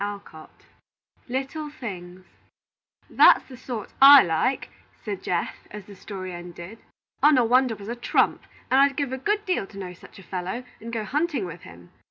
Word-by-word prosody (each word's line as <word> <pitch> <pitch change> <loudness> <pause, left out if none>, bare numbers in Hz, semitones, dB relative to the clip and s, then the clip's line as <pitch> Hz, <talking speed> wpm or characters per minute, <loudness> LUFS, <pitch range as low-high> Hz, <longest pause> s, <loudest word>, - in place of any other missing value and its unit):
Little 270 +4 -4
Things 185 -9 -9 0.8
"That's - - +5
the 260 - -11
sort 245 -4 -7
I 280 0 +10
like," 175 +11 -1 0.3
said 205 -3 -4
Geoff, 175 -1 -2 0.2
as 210 -2 -9
the 200 - -13
story 185 -2 -7
ended; 175 +4 -10 0.4
"Onawandah 255 -4 +4
was 200 0 -11
a 235 - -4
trump, 240 - +1 0.3
and 265 +1 +5
I'd 280 -1 +3
give 280 -3 -2
a 260 - -4
good 415 +8 -1
deal 365 - -1
to 195 - -14
know 185 -2 -6
such 180 - -16
a 195 - -13
fellow, 185 +7 -5 0.2
and 230 +1 -8
go 225 -2 -3
hunting 295 - -1
with 170 -1 -9
him. 85 0 -15
225 Hz, 165 wpm, -24 LUFS, 185-265 Hz, 0.8 s, I